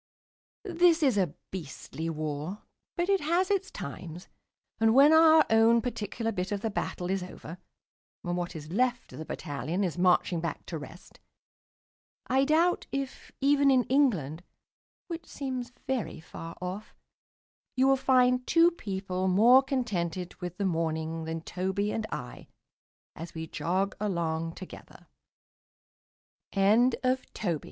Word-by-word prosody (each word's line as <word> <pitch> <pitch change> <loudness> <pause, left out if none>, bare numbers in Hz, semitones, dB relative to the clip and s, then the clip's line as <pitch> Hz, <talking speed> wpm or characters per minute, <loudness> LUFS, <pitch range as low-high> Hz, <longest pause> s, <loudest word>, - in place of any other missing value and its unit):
This 345 -4 +3
is 265 -5 +4
a 180 -7 +1 0.2
beastly 165 -1 -6
war. 155 +4 -4 0.3
But 345 +1 0
it 390 -1 +2
has 345 +6 +1
its 390 -1 0
times; 165 +5 -8 0.5
and 225 +1 +4
when 285 +3 +7
our 320 -1 +7
own 225 +1 +5
particular 225 -1 -3
bit 185 -1 -3
of 205 -1 -2
the 225 - -2
battle 180 -2 -3
is 195 -1 0
over, 180 -1 -9 0.6
and 175 0 -2
what 175 0 -4
is 155 0 -8
left 245 +4 0
of - - -9
the 160 - -6
battalion 155 +6 -3
is 175 -2 -2
marching 180 -1 +3
back 165 -3 -4
to 165 - -5
rest, 160 +4 -12 1.1
I 265 +2 +2
doubt 330 +4 +2
if, 275 -1 -5
even 280 0 +4
in 260 -2 +4
England 190 - +1 0.7
(which 335 -1 -6
seems 255 -3 -5
very 250 -10 -2
far 165 +1 -9
off), 185 +4 -6 0.8
you 260 +1 +3
will 270 - +5
find 255 -1 +3
two 335 +1 +5
people 190 - -3
more 230 +8 +6
contented 185 - -2
with 180 0 -5
the 200 - -1
morning 160 -2 -2
than 160 0 -4
Toby 190 +4 -2
and 220 -1 -3
I, 125 0 -7 0.7
as 165 +1 -9
we 160 0 -4
jog 185 +5 -1
along 165 -5 -2
195 Hz, 135 wpm, -29 LUFS, 170-265 Hz, 1.1 s, when